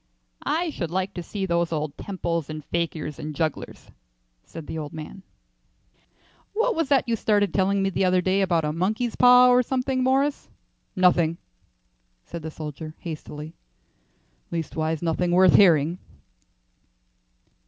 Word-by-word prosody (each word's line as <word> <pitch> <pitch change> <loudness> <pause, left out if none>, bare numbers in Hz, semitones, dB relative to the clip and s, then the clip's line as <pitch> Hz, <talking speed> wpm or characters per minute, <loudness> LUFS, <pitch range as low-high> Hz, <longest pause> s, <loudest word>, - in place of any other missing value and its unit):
"I 330 +1 0
should 170 - -4
like 190 +3 -2
to 175 - -5
see 195 +3 -4
those 170 -2 0
old 150 -2 -3
temples 170 -5 -3
and 155 -1 -7
fakirs 165 -3 -3
and 155 -1 -6
jugglers," 160 -2 -4 0.5
said 165 -2 -10
the - - -6
old 150 -2 -5
man. 160 +5 -8 1.3
"What 455 +3 +1
was 325 -4 -1
that 275 -3 +3
you 230 - +1
started 205 -4 +1
telling 195 0 +2
me 195 - 0
the 195 - 0
other 185 0 +3
day 190 +2 +1
about 170 -4 +1
a 150 - -1
monkey's 215 +8 -1
paw 250 0 +7
or 250 0 +5
something, 255 +1 -1
Morris?" 270 +3 +1 0.5
"Nothing," 175 -3 +3 0.9
said 170 - -7
the 160 - -5
soldier, 155 0 -8
hastily. 155 -1 -8 1.0
"Leastways 160 -1 -3
nothing 170 +1 0
worth 185 0 +6
hearing." 170 -2 +5
175 Hz, 145 wpm, -24 LUFS, 160-205 Hz, 1.3 s, paw